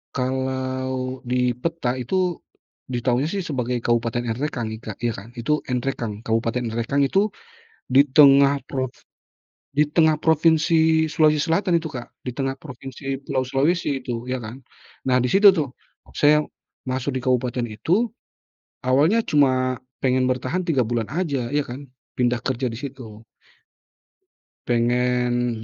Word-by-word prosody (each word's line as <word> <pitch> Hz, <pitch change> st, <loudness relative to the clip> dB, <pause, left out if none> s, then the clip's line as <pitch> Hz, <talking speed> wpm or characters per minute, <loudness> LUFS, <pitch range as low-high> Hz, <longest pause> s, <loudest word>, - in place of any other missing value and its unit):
Kalau 130 Hz, 0 st, -2 dB
di 125 Hz, 0 st, +2 dB
peta 125 Hz, -1 st, -2 dB
itu, 180 Hz, +6 st, -1 dB, 0.5 s
diketahuinya 125 Hz, +2 st, 0 dB
sih 195 Hz, +3 st, -2 dB
sebagai 125 Hz, -6 st, -2 dB
Kabupaten 120 Hz, 0 st, 0 dB
Enrekang 120 Hz, -1 st, -3 dB
ik 110 Hz, +1 st, -7 dB
Kak, 105 Hz, -, -6 dB
ya 120 Hz, -, +2 dB
kan. 110 Hz, +1 st, -9 dB
Itu 150 Hz, +6 st, 0 dB
Enrekang, 120 Hz, -4 st, -3 dB
Kabupaten 115 Hz, +2 st, 0 dB
Enrekang 120 Hz, +5 st, 0 dB
itu 195 Hz, +9 st, +2 dB, 0.6 s
di 130 Hz, +2 st, +6 dB
tengah 140 Hz, 0 st, +6 dB
props 130 Hz, -2 st, -4 dB, 0.7 s
di 150 Hz, +2 st, +2 dB
tengah 155 Hz, 0 st, +3 dB
Provinsi 160 Hz, 0 st, +3 dB
Sulawesi 155 Hz, -1 st, +3 dB
Selatan 170 Hz, +1 st, +2 dB
itu 160 Hz, -, -7 dB
Kak, 125 Hz, -5 st, -8 dB, 0.2 s
di 125 Hz, -, -3 dB
tengah 135 Hz, 0 st, -2 dB
provinsi 135 Hz, -1 st, -7 dB
Pulau 130 Hz, -1 st, -1 dB
Sulawesi 140 Hz, +1 st, 0 dB
itu 120 Hz, -1 st, -5 dB
ya 130 Hz, -1 st, -3 dB
kan. 110 Hz, +4 st, -8 dB, 0.5 s
Nah 125 Hz, -1 st, +3 dB
di 125 Hz, -, 0 dB
situ 195 Hz, +2 st, +7 dB
tuh 145 Hz, -6 st, -1 dB, 0.4 s
saya 150 Hz, +1 st, +4 dB, 0.5 s
masuk 130 Hz, +1 st, -2 dB
di 130 Hz, -, -2 dB
kabupaten 125 Hz, -1 st, 0 dB
itu 180 Hz, -, 0 dB, 0.7 s
awalnya 150 Hz, -, +3 dB
cuma 130 Hz, -3 st, +2 dB, 0.2 s
pengen 130 Hz, -1 st, +2 dB
bertahan 130 Hz, +8 st, -1 dB
3 140 Hz, -7 st, +2 dB
bulan 115 Hz, -1 st, -2 dB
aja 140 Hz, -6 st, -2 dB
ya 150 Hz, -, +2 dB
kan, 135 Hz, +2 st, -8 dB, 0.3 s
pindah 120 Hz, -1 st, +1 dB
kerja 130 Hz, 0 st, -1 dB
di 115 Hz, -, -5 dB
situ. 120 Hz, -4 st, -9 dB, 1.4 s
Pengen 120 Hz, -1 st, +1 dB
130 Hz, 140 wpm, -23 LUFS, 120-150 Hz, 1.4 s, situ